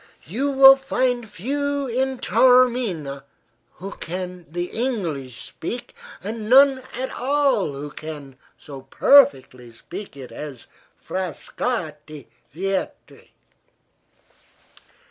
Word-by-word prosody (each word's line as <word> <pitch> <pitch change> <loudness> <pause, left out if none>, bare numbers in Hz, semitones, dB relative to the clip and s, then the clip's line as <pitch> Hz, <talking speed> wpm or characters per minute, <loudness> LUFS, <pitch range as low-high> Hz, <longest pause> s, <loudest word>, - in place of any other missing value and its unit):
You 240 - -2
will 270 0 +8
find 250 -3 -1
few 285 +7 -2
in 260 +1 -1
Taormina 240 - +2 0.5
who 195 +2 -8
can 180 0 -6
the 175 +2 -4
English 165 - -3
speak, 240 +9 -6 0.3
and 215 +1 -5
none 270 +1 +6
at 260 +2 -3
all 270 - +1
who 145 +2 -7
can 150 -4 -9 0.2
so 140 -3 -10
perfectly 130 - +3
speak 140 - -10
it 130 -2 -10
as 140 -6 -8 0.3
Frascatti 160 - -4 0.3
Vietri." 190 +5 -4
195 Hz, 95 wpm, -22 LUFS, -, 0.5 s, will